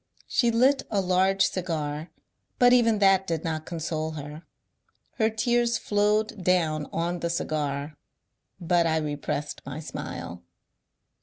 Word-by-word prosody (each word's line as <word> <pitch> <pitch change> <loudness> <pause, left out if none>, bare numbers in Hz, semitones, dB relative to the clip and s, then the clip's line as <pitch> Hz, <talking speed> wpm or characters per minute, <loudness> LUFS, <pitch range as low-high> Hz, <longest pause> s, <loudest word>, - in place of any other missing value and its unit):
She 240 - +2
lit 260 +4 +3
a 205 - +1
large 190 +1 +3
cigar, 160 -3 -3 0.5
but 245 0 +6
even 230 -3 +4
that 195 -1 +4
did 165 -2 -2
not 155 -1 -3
con 170 -2 -5
sole 160 0 -3
her; 150 +1 -7 0.8
her 220 0 +4
tears 235 +1 +1
flowed 210 0 0
down 160 -5 +1
on 175 +1 -2
the 170 - -2
cigar, 150 -3 -2 0.6
but 175 -1 +2
I 160 0 +1
repressed 150 -1 -3
my 135 +3 -6
smile. 90 - -7
170 Hz, 135 wpm, -26 LUFS, 155-210 Hz, 0.8 s, but